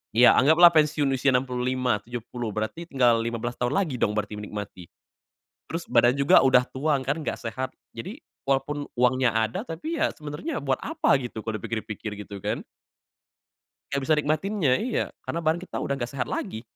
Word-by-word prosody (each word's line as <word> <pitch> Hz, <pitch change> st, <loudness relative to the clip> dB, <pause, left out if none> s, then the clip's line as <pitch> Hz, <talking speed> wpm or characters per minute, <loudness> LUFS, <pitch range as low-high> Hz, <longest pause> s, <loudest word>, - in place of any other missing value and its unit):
Ya 120 Hz, +2 st, +8 dB
anggaplah 160 Hz, +5 st, +7 dB
pensiun 150 Hz, -2 st, +3 dB
usia 130 Hz, +1 st, +2 dB
65, 125 Hz, -2 st, 0 dB
70, 120 Hz, 0 st, -5 dB
berarti 110 Hz, +11 st, -4 dB
tinggal 125 Hz, -6 st, +3 dB
15 115 Hz, +1 st, -3 dB
tahun 125 Hz, 0 st, 0 dB
lagi 165 Hz, -10 st, 0 dB
dong 105 Hz, -, +1 dB
berarti 105 Hz, 0 st, -3 dB
menikmati? 105 Hz, -4 st, -7 dB, 0.8 s
Terus 165 Hz, +1 st, -4 dB
badan 120 Hz, +1 st, +5 dB
juga 140 Hz, +6 st, +6 dB
udah 125 Hz, -1 st, +6 dB
tua 145 Hz, +2 st, 0 dB
kan, 140 Hz, +5 st, -1 dB
nggak 155 Hz, -, -3 dB
sehat. 130 Hz, +3 st, -4 dB, 0.2 s
Jadi 200 Hz, -, -8 dB, 0.3 s
walaupun 140 Hz, +2 st, 0 dB
uangnya 125 Hz, -1 st, +2 dB
ada 110 Hz, +5 st, -1 dB
tapi 290 Hz, -, -4 dB
ya 320 Hz, -, +3 dB
sebenernya 150 Hz, -, -5 dB
buat 135 Hz, -2 st, 0 dB
apa 315 Hz, -, +1 dB
gitu 120 Hz, -4 st, -6 dB
kalau 110 Hz, -1 st, -3 dB
dipikir-pikir, 110 Hz, 0 st, -5 dB
gitu 100 Hz, -1 st, -8 dB
kan? -, -, -3 dB, 1.3 s
Nggak 140 Hz, 0 st, 0 dB
bisa 155 Hz, -, +4 dB
nikmatinnya, 155 Hz, +2 st, 0 dB
iya 240 Hz, +1 st, 0 dB, 0.2 s
karena 170 Hz, -, -2 dB
badan 160 Hz, +2 st, +1 dB
kita -, -, -8 dB
udah 140 Hz, -, -1 dB
nggak 120 Hz, 0 st, -4 dB
sehat 125 Hz, -3 st, -3 dB
lagi. 110 Hz, -, -4 dB
130 Hz, 170 wpm, -26 LUFS, 115-155 Hz, 1.3 s, Ya